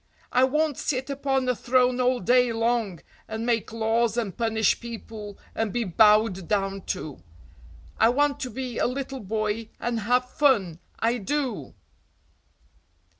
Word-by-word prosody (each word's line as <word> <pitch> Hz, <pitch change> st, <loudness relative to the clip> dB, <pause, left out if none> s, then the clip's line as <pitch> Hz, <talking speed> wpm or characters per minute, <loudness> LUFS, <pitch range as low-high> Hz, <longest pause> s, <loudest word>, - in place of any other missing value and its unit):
I 255 Hz, +1 st, +5 dB
won't 300 Hz, +1 st, 0 dB
sit 265 Hz, 0 st, -2 dB
upon 270 Hz, -2 st, 0 dB
a 250 Hz, -, +2 dB
throne 250 Hz, +1 st, +2 dB
all 250 Hz, 0 st, +2 dB
day 245 Hz, +4 st, +4 dB
long 225 Hz, -5 st, 0 dB, 0.3 s
and 220 Hz, +1 st, -4 dB
make 230 Hz, -3 st, 0 dB
laws 225 Hz, 0 st, +1 dB
and 220 Hz, -6 st, -2 dB
punish 225 Hz, -2 st, +1 dB
people 220 Hz, -3 st, -8 dB, 0.2 s
and 225 Hz, -2 st, -1 dB
be 240 Hz, +2 st, -1 dB
bowed 210 Hz, -1 st, +4 dB
down 195 Hz, -1 st, -1 dB
to; 145 Hz, -, -4 dB, 0.8 s
I 225 Hz, -, +6 dB
want 290 Hz, +3 st, +1 dB
to 255 Hz, -, -3 dB
be 250 Hz, 0 st, -5 dB
a -, -, +2 dB
little 270 Hz, +1 st, -4 dB
boy 215 Hz, +1 st, -2 dB
and 240 Hz, -1 st, -1 dB
have 245 Hz, +4 st, +1 dB
fun, 230 Hz, -, +2 dB, 0.2 s
I 235 Hz, +2 st, 0 dB
do!" 275 Hz, +4 st, -3 dB
235 Hz, 145 wpm, -25 LUFS, 215-255 Hz, 0.8 s, I